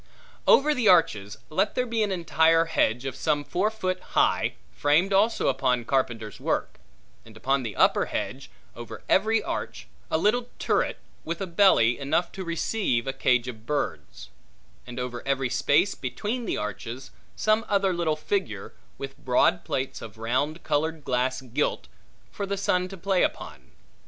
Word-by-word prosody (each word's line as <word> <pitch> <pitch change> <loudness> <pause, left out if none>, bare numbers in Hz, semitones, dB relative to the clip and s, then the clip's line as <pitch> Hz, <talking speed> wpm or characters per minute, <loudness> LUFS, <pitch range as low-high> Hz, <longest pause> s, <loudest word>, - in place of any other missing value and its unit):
Over 300 +2 +6
the 250 -6 0
arches 105 - +3
let 195 +6 +1
there 250 - +1
be 230 -2 -1
an 210 -2 +1
entire 165 -2 +3
hedge 125 -6 +1
of 135 -2 -3
some 145 0 0
four 190 +7 0
foot 185 -4 -2 0.2
high, - - +2 0.2
framed 160 +7 +2
also 210 +4 +3
upon 125 -3 +1
carpenter's 120 -5 -1
work; - - -2 0.4
and 110 -1 -15
upon 135 +4 +1
the 110 -5 -5
upper - - +4
hedge, - - -4 0.3
over 115 -2 -9
every 220 +3 +3
arch, - - -4 0.2
a - - +2
little 235 +7 +1
turret, - - 0 0.3
with 170 +1 -4
a 195 - -2
belly, 170 - +4
enough 155 +5 0
to 190 - -6
receive 170 - -1
a 135 - -2
cage 125 -2 +2
of 115 -2 -8
birds: 145 - -3 0.6
and 125 0 -6
over 125 -1 -4
every 135 -2 0
space 150 +8 +3
between 210 - -4
the - - -1
arches 115 +5 -6 0.2
some 215 +1 +2
other 195 -2 +2
little 170 -3 0
figure, 395 - -3 0.2
with 135 0 -7
broad 130 +7 +3
plates 130 0 -3
of 110 -1 -10
round 130 +8 -1
colored 160 +1 -1
glass 130 +1 0
gilt, 130 +3 -2 0.4
for 200 - -4
the 200 0 -2
sun 185 -2 +1
to 195 +1 -9
play 190 +1 +1
upon. - - -3
155 Hz, 160 wpm, -26 LUFS, 125-195 Hz, 0.6 s, Over